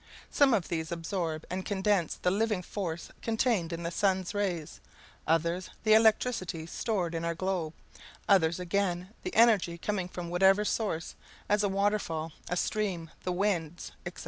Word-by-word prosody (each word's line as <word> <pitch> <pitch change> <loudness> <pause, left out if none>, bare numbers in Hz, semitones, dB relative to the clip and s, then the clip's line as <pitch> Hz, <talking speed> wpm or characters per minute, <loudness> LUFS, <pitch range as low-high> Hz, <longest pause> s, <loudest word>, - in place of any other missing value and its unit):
Some 275 -4 +5
of 190 -6 -1
these 160 -1 -3
absorb 165 -2 -3
and 185 +1 -3
condense 195 -3 +1
the 180 - 0
living 210 -1 0
force 170 -4 -4
contained 225 -6 +1
in 170 0 -4
the 170 - -2
sun's 190 0 +1
rays; 185 -7 -2 0.5
others, 170 +3 +1
the 215 -1 +5
electricity 220 -6 +3
stored 180 -1 -2
in 165 0 -2
our 170 0 -1
globe; 175 -3 -2 0.5
others 170 -4 +4
again, 180 0 -1
the 365 - -5
energy 215 -7 +4
coming 185 0 -2
from 175 -1 -6
whatever 195 +3 +4
source, 200 -7 -1 0.3
as 210 0 +3
a 205 - +1
waterfall, 195 -5 0 0.2
a 180 - -1
stream, 180 -6 -1
the 180 - 0
winds, 175 -4 -1
etc. 175 0 -7
185 Hz, 155 wpm, -30 LUFS, 170-205 Hz, 0.5 s, Some